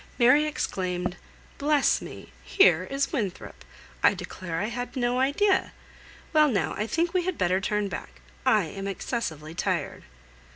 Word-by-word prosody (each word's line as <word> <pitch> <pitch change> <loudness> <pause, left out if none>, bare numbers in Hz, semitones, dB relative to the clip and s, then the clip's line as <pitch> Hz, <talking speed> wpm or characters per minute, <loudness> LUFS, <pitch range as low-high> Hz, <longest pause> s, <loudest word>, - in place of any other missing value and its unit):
Mary 255 +5 +5
exclaimed, 180 -10 -2 0.4
"Bless 290 0 +3
me! - - -10
here 180 - +4
is 275 +5 -1
Winthrop. 205 - -4 0.4
I - - +5
declare 170 -3 -5
I 205 - 0
had 245 +1 -5
no 245 -1 0
idea! 335 +10 +2 0.6
Well 305 -1 +6
now, 230 -8 0
I 215 - -2
think 335 +6 0
we 365 -2 +1
had 370 -2 -2
better 185 +1 +1
turn 210 +1 0
back; 65 - -7 0.2
I - - +4
am 195 0 -6
excessively 170 - -4
tired." - - -2
235 Hz, 150 wpm, -26 LUFS, 185-285 Hz, 0.6 s, Well